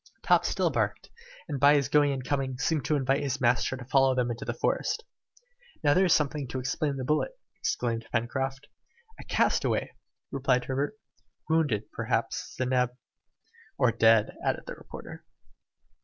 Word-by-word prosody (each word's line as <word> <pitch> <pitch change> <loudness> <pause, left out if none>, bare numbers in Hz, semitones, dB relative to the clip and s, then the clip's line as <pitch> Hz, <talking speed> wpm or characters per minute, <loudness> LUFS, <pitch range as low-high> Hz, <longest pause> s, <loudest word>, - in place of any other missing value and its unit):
Top - - +4
still - - +1
barked, - - -2 0.4
and 145 -4 -3
by 145 +2 +6
his 140 -3 +2
going 145 0 +4
and 130 -2 -4
coming, 135 -2 -1
seemed 150 +1 0
to 155 - +2
invite 135 0 +1
his 140 -2 -2
master 125 +1 +2
to 125 - -9
follow 135 0 +3
him 120 -1 +1
into 115 - -5
the - - -1
forest. 465 - -1 0.8
"Now 145 -1 +5
there's 185 0 +3
something 150 -2 +1
to 130 - -4
explain 140 +3 -1
the 130 - -4
bullet!" 155 - 0 0.2
exclaimed 115 -1 -2
Pencroft. 135 +4 -2 0.5
"A - - -8
castaway!" - - +1 0.4
replied 130 -2 +1
Herbert. 140 +10 -2 0.5
"Wounded, 145 -10 +1
perhaps!" - - -2
said 130 0 -1
Neb. 125 -1 +1 0.8
"Or 125 -4 +4
dead!" 110 -1 +4
added - - 0
the - - -6
reporter. - - -10
135 Hz, 155 wpm, -28 LUFS, 125-145 Hz, 0.8 s, by